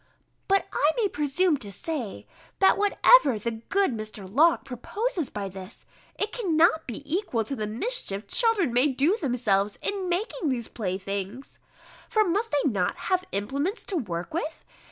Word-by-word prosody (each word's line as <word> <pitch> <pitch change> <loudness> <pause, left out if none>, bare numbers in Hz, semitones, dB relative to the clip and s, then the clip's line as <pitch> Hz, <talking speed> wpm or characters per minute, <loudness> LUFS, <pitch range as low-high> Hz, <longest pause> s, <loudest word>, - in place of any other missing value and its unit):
But 390 0 +2
I 305 +2 +3
may 450 -4 +3
presume 300 +3 +1
to 210 -6 -7
say, 250 - -5 0.3
that 385 - +5
whatever 410 - +5
be - - -3
the 235 +2 -2
good 275 - 0
Mr. 215 -2 -7
Locke 305 - +3
proposes 335 - -3
by 200 -1 -4
this, 190 +2 -9 0.3
it 415 +1 -1
cannot 330 -7 +2
be 240 +3 -6
equal 295 - 0
to 275 +6 -3
the 215 -4 -3
mischief 220 - -2
children 405 - +2
may 250 +4 +4
do 285 +7 +2
themselves 215 - 0
in 390 -3 -2
making 355 -3 -1
these 240 -4 -2
playthings! 200 +4 -5 0.5
For 435 - +4
must 415 +5 0
they 290 0 +2
not 195 -8 0 0.2
have 370 0 +2
implements 280 - -2
to 395 - -4
work 180 - -3
with? 320 -1 -3
280 Hz, 160 wpm, -26 LUFS, -, 0.5 s, that